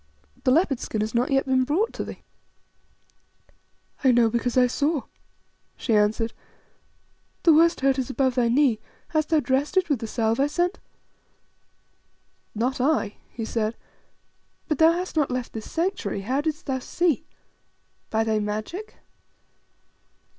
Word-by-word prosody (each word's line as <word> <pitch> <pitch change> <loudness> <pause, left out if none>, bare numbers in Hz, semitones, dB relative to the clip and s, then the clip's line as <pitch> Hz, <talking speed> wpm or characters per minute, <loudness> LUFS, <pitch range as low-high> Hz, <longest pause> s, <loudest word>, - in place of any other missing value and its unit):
The - - +4
leopard 280 -3 +3
skin 215 - -3
has 215 0 -2
not 240 +1 +1
yet 270 0 +2
been 260 -1 +2
brought 330 - 0
to - - -4
thee." - - -9 1.8
"I 260 - +6
know 235 -2 +4
because 240 +2 -1
I 250 - +6
saw," 290 +3 0 0.7
she 230 - -1
answered. 215 +2 +2 1.1
"The 330 - +7
worst 335 +1 +4
hurt 270 0 +3
was 260 -1 -2
above 265 -1 +1
thy 240 -2 +2
knee; 250 -3 +3 0.3
hast 310 -2 0
thou 320 -2 +4
dressed 275 +6 0
it 370 -3 +3
with 285 -5 +1
the 225 - -5
salve 225 +1 0
I 280 - +3
sent?" 355 +6 -1 1.8
"Not 250 +4 -1
I," 260 -7 +1
he 225 - -5
said. 220 0 -2 0.9
"But 305 -4 -1
thou 320 +1 +7
hast 360 +1 -4
not 300 -3 +2
left 250 -1 -3
this 220 -1 -7
Sanctuary; 325 - -1
how 255 +8 0
didst 310 +1 -3
thou 265 -2 -1
see? 320 +3 0 0.8
By 220 0 +1
thy 220 -1 +1
magic?" 215 - -4
260 Hz, 150 wpm, -25 LUFS, 230-310 Hz, 1.8 s, The